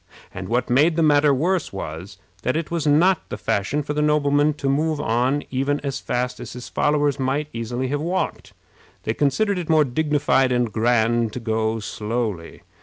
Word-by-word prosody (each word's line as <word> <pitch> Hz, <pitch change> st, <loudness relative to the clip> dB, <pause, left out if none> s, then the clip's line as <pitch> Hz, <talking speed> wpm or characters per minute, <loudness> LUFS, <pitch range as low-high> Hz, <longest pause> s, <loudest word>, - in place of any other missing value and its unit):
And 95 Hz, 0 st, -6 dB
what 120 Hz, +1 st, 0 dB
made 150 Hz, +7 st, +3 dB
the 165 Hz, -, +2 dB
matter 145 Hz, -1 st, +4 dB
worse 170 Hz, +7 st, 0 dB
was, 90 Hz, 0 st, -7 dB, 0.2 s
that 130 Hz, -, -1 dB
it 165 Hz, 0 st, -3 dB
was 165 Hz, -3 st, -1 dB
not 165 Hz, +5 st, +3 dB
the -, -, -4 dB
fashion 100 Hz, +10 st, -1 dB
for 150 Hz, -, -3 dB
the 150 Hz, -, 0 dB
nobleman 150 Hz, 0 st, +2 dB
to 140 Hz, -, -4 dB
move 150 Hz, +2 st, +1 dB
on 130 Hz, +2 st, 0 dB
even 135 Hz, +2 st, 0 dB
as 140 Hz, -1 st, -3 dB
fast 125 Hz, +1 st, -2 dB
as -, -, -8 dB
his 125 Hz, 0 st, -8 dB
followers 145 Hz, -2 st, +1 dB
might 140 Hz, +3 st, -1 dB
easily 120 Hz, +3 st, -3 dB
have 145 Hz, +1 st, -1 dB
walked. 175 Hz, +4 st, -3 dB, 0.5 s
They 110 Hz, -, -1 dB
considered 180 Hz, -, +1 dB
it 170 Hz, -, -6 dB
more 155 Hz, -2 st, +5 dB
dignified 140 Hz, -1 st, +1 dB
and 120 Hz, -2 st, +1 dB
grand 115 Hz, -1 st, +2 dB
to -, -, -4 dB
go 110 Hz, -1 st, -1 dB
slowly. 105 Hz, -5 st, -4 dB
135 Hz, 180 wpm, -22 LUFS, 120-150 Hz, 0.5 s, more